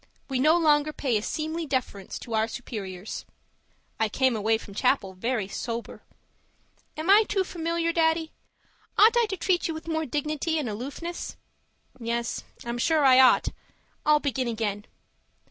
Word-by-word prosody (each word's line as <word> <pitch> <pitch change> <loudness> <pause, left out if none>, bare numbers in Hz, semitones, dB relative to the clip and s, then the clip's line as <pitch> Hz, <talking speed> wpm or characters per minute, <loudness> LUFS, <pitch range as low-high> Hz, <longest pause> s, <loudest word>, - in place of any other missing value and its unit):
We 260 - +1
no 310 +5 +5
longer 305 -2 +3
pay 265 -5 -1
a 210 - +2
seemly 315 +6 -3
deference 255 -8 -3
to 235 - -8
our 220 0 +2
superiors. 205 -5 -6 0.8
I 220 -1 +2
came 260 +2 +2
away 220 +1 +2
from 210 -2 -11
chapel 220 -4 +1
very 220 +1 -2
sober. 230 +3 -5 1.0
Am 315 +2 -4
I 410 +3 +7
too 390 -2 +2
familiar, 335 -1 -1
Daddy? 320 -1 +2 0.7
Ought 445 +3 +7
I 475 -1 +4
to 385 - -4
treat 355 +1 +1
you 325 - -3
with 315 +1 -8
more 315 -1 -1
dignity 305 +4 -1
and 295 -5 -1
aloofness? 275 +11 -5 0.6
Yes, 235 0 -2 0.2
I'm 235 0 -3
sure 310 +2 +3
I 260 -1 +7
ought. 260 -1 +6 0.5
I'll 300 0 +5
begin 265 -3 -1
again. 215 -3 -2
275 Hz, 155 wpm, -26 LUFS, 230-320 Hz, 1.0 s, I